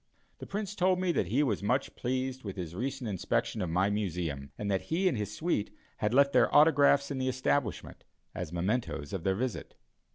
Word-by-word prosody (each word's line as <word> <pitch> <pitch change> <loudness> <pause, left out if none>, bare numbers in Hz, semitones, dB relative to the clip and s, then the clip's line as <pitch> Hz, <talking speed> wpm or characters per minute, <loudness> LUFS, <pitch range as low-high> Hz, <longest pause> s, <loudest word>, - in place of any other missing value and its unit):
The - - -8
Prince 205 0 -3
told 185 -1 +2
me 185 -1 +1
that 100 - 0
he 130 +10 +2
was 110 -9 0
much 125 +7 0
pleased 130 +1 -2
with 100 -3 -5
his 85 -4 -5
recent 130 +5 -3
inspection 105 +2 -1
of 90 - -2
my 95 +5 +2
Museum, 85 -9 -3
and 100 -1 -2
that 95 - +1
he 180 +4 +2
and 175 - +2
his 105 -2 -3
suite 105 -3 -1 0.3
had 105 - 0
left 140 +2 +4
their 125 -2 +4
autographs 145 -2 +5
in 135 - -2
the 130 0 0
establishment, 130 -3 -1 0.3
as 90 -3 -5
mementos 90 - -2
of 95 -4 -3
their 95 -1 +1
visit. 125 +3 -4
120 Hz, 200 wpm, -30 LUFS, 95-140 Hz, 0.3 s, autographs